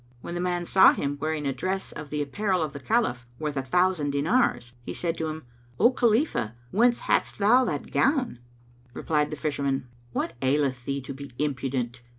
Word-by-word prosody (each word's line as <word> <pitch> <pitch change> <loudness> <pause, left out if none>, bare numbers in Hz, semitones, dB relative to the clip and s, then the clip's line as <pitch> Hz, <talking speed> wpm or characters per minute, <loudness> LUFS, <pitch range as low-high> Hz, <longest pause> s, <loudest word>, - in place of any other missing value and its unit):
When - - -6
the 175 - -3
man 175 -1 -1
saw 190 +2 +7
him 145 0 -3
wearing 155 -1 -1
a 135 - 0
dress 190 +6 -3
of 150 -1 -8
the 150 0 -1
apparel 185 +4 0
of 150 - -4
the 140 - -6
Caliph, 130 - 0
worth 150 0 -3
a 135 - 0
thousand 180 +2 +1
dinars, 140 - +1
he - - -6
said 170 -1 -1
to 160 - -1
him, 155 -1 -6 0.3
"O 235 - +6
Khalifah, 230 - +1 0.2
whence 240 +3 +3
hadst - - +1
thou 225 +6 +5
that 145 - -3
gown?" 265 - +1 0.6
Replied 150 -2 0
the 155 - -5
Fisherman, 140 -2 -1 0.2
"What - - -2
aileth 130 -2 +1
thee 140 0 -2
to 135 +1 -7
be 140 +1 -9
impudent? 130 -4 -2
150 Hz, 185 wpm, -26 LUFS, 140-185 Hz, 0.6 s, saw